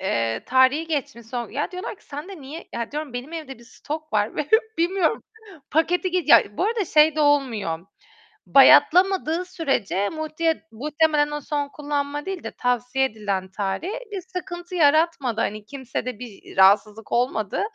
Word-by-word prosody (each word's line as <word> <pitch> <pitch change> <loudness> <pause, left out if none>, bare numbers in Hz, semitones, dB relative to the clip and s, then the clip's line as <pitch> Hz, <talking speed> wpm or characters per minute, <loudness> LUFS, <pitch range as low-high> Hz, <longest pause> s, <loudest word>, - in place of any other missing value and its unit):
eee, 115 -11 -1
tarihi 260 +5 +3
geçmiş 280 -7 -4
son. 240 0 -5
Ya 290 +6 -3
diyorlar 365 +3 -6
ki - - -26
"Sende 305 +4 -8
niye?" 295 +6 -9
"Ya," 235 -1 -4
diyorum, 300 -3 -5
"benim 250 +6 -6
evde 305 -6 -7
bir 235 - -16
stok 305 +5 -7
var 210 0 0
ve 300 - -2 0.3
bilmiyorum." 345 0 +1 0.5
Paketi 355 +4 +1
geç 360 -4 -1
ya 205 -5 +5
bu - - +1
arada 440 -2 0
şey 310 -1 +4
de 305 - +1
olmuyor, 240 - +1 0.7
bayatlamadığı 360 -1 +5
sürece 270 - -1
multi 315 -2 -2
muhtemelen 295 +4 +1
o 295 - -4
son 290 0 -3
kullanma 290 0 -3
değil 385 -2 -5
de - - -5
tavsiye 250 +2 0
edilen 205 -6 -3
tarih, 200 - -3 0.2
bir 390 -3 -4
sıkıntı 360 -1 -7
yaratmadı 295 -7 +2
hani 210 0 -3
kimsede 255 -3 -5
bir 230 -7 -11
rahatsızlık 205 +3 +4
olmadı. 235 -4 0
290 Hz, 155 wpm, -23 LUFS, 235-325 Hz, 0.7 s, ya